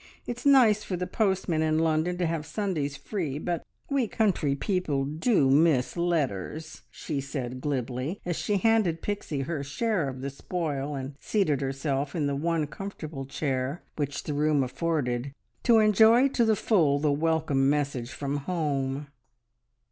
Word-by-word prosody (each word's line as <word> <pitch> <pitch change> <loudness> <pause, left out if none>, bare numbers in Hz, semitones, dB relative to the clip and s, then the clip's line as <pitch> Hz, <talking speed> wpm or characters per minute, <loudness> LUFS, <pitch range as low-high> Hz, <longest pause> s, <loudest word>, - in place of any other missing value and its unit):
It's 245 +3 -3
nice 235 -7 +6
for 185 - -3
the 180 - -2
postmen 190 -6 0
in 155 0 +2
London 160 +2 +1
to 180 - 0
have 165 -2 -1
Sundays 160 -9 -2
free, 165 -10 -3
but 170 +2 -2 0.2
we 275 -4 +1
country 185 -11 +1
people 150 -5 -1
do 155 - +2
miss 145 -3 +3
letters," 155 - -2
she 145 -4 -4
said 130 -2 -5
glibly, 130 - -2
as 175 -1 -1
she 205 +4 0
handed 210 -6 +2
Pixie 200 -9 -3
her 140 +1 -3
share 165 +2 -1
of 130 -1 -7
the 140 +1 -3
spoil, 145 -2 -3
and 135 +1 -5
seated 155 -10 +1
herself 135 +1 -2
in 155 -4 0
the 140 0 0
one 165 +1 0
comfortable 155 -5 -7
chair 135 +1 -2
which 145 -2 -3
the 150 - -3
room 150 -1 +2
afforded, 135 -2 -2 0.3
to 235 -2 +5
enjoy 220 +4 +6
to 240 -3 +2
the 220 -1 +3
full 165 -10 +3
the 150 0 +1
welcome 150 -3 +1
message 140 -5 -1
from 140 +3 -3
home. 145 -3 -2
155 Hz, 155 wpm, -27 LUFS, 140-180 Hz, 0.3 s, nice